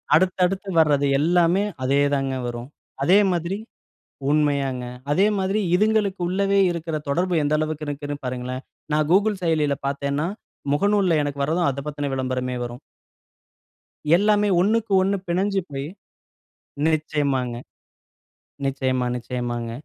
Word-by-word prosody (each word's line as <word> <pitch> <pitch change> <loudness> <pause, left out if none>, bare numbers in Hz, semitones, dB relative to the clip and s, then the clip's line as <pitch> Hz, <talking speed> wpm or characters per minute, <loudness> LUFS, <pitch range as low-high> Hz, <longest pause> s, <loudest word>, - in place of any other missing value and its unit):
அடுத்தடுத்து 185 +2 +1
வர்றது 145 -3 +3
எல்லாமே 175 +4 +3 0.2
அதே 140 +2 +2
தாங்க 135 -1 -1
வரும். 120 +1 -6 0.3
அதே 185 +7 +6
மாதிரி 175 +3 -1 0.7
உண்மையாங்க. 140 -4 +1 0.3
அதே 190 +7 +4
மாதிரி 195 +3 0 0.2
இதுங்களுக்கு 210 -1 +2
உள்ளேவே 195 +2 +1
இருக்கிற 165 -1 -4
தொடர்பு 175 +4 +1
எந்த 145 +1 0
அளவுக்கு 155 0 -2
இருக்குன்னு 145 0 -4
பாருங்களேன். 125 +1 -4 0.3
நான் 150 0 +2
Google 205 +2 +3
செயலியில 155 -4 +1
பார்த்தேன்னா 140 +2 -1 0.5
முகநூல்ல 200 +2 +2
எனக்கு 140 -1 -3
வர்றதும் 165 +3 +1
அத 140 0 -3
பத்துன 145 -1 -3
விளம்பரமே 130 -1 -2
வரும். 120 0 -6 1.4
எல்லாமே 210 +1 +3
ஒண்ணுக்கு 215 +2 +1
ஒண்ணு 195 +1 +1
பிணஞ்சு 195 +3 +1
போய் 135 0 -4 1.0
நிச்சயமாங்க. 145 -5 0 1.1
நிச்சயமா 130 -2 0
நிச்சயமாங்க. 120 -1 -4
150 Hz, 115 wpm, -23 LUFS, 135-185 Hz, 1.4 s, அதே